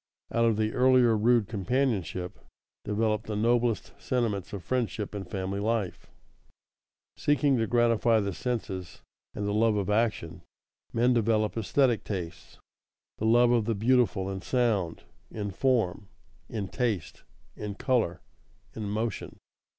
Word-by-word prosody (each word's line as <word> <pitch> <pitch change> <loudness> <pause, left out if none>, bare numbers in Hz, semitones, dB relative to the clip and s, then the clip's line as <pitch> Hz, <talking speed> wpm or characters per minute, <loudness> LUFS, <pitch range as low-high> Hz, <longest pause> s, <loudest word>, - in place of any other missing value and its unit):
Out 115 0 +2
of 115 -2 +2
the 110 0 0
earlier 125 -2 +5
rude 115 0 +3
companionship 105 -5 -1 0.4
develop 105 +1 0
the 110 - -3
noblest 115 +1 +1
sentiments 110 -7 -1
of 100 -3 -6
friendship 115 -5 -2
and 100 -3 -6
family 95 0 -3
life. 110 -3 -2 1.1
Seeking 145 -1 +2
to 110 - +1
gratify 115 -1 +3
the 100 -1 -2
senses 95 -8 -4 0.3
and 105 - -3
the 100 - -1
love 110 0 +3
of 100 -1 -1
action, 105 -6 0 0.5
men 120 +2 +3
develop 110 -2 +1
esthetic 120 +2 +2
tastes, 90 -5 -6 0.6
the 110 - 0
love 120 +1 +5
of 115 -3 +2
the 115 0 0
beautiful 110 -3 +2
in 95 -1 -4
sound, 110 -9 0 0.3
in 105 -2 -4
form, 105 -4 0 0.4
in 105 -3 -3
taste, 110 -5 -2 0.3
in 105 -1 -5
color, 110 - 0 0.5
in 105 -2 -5
motion. 110 +1 -3
110 Hz, 135 wpm, -28 LUFS, 100-120 Hz, 1.1 s, earlier